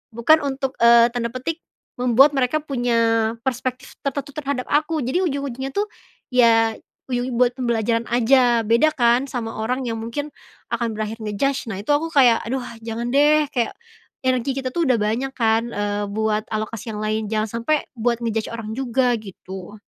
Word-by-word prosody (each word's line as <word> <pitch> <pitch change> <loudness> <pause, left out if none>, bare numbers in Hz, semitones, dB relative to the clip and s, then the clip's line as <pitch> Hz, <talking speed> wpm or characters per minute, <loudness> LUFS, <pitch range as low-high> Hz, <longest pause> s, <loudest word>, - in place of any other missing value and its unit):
bukan 310 +7 +5
untuk, 270 -1 -2
eee, 235 0 +7
tanda 235 -1 -2
petik 310 +6 -4 0.4
membuat 250 +4 +5
mereka 260 +2 +1
punya 230 -5 +1
perspektif 255 +1 -3
tertentu 280 0 -3
terhadap 280 -4 -3
aku 310 +2 +1
jadi 305 +9 0
ujung-ujungnya 270 -2 -4
tuh, 410 - +1 0.5
ya 225 -2 +5 0.4
uju 245 +1 -1
buat 245 0 +3
pembelajaran 235 -2 -1
aja 240 -1 +3
beda 235 +8 +4
kan 245 0 +2
sama 230 -3 -4
orang 250 +4 -1
yang 225 -1 -2
mungkin, 260 +6 -4 0.4
akan 235 -1 -1
berakhir 215 +1 -3
nge-judge 235 +5 -1
nah 190 - -4
itu 215 - -14
aku 315 +3 0
kayak, 245 -5 +5
"Aduh 260 +1 -2 0.2
jangan 230 +1 -4
deh," 300 +2 +5
kayak, 235 -3 0 0.5
energi 255 +1 0
kita 265 -1 -2
tuh 340 -1 +1
udah 250 - +4
banyak 225 +6 0
kan, 225 0 +2
eee, 205 -1 -2
buat 215 +1 -1
alokasi 220 +1 -4
yang - - -5
lain 215 0 -1
jangan 215 0 0
sampai 300 +5 +1
buat 235 -1 0
nge-judge 225 -1 -1
orang 220 -1 -5
juga 250 -1 +1
gitu. 190 0 -10
240 Hz, 165 wpm, -22 LUFS, 225-270 Hz, 0.5 s, eee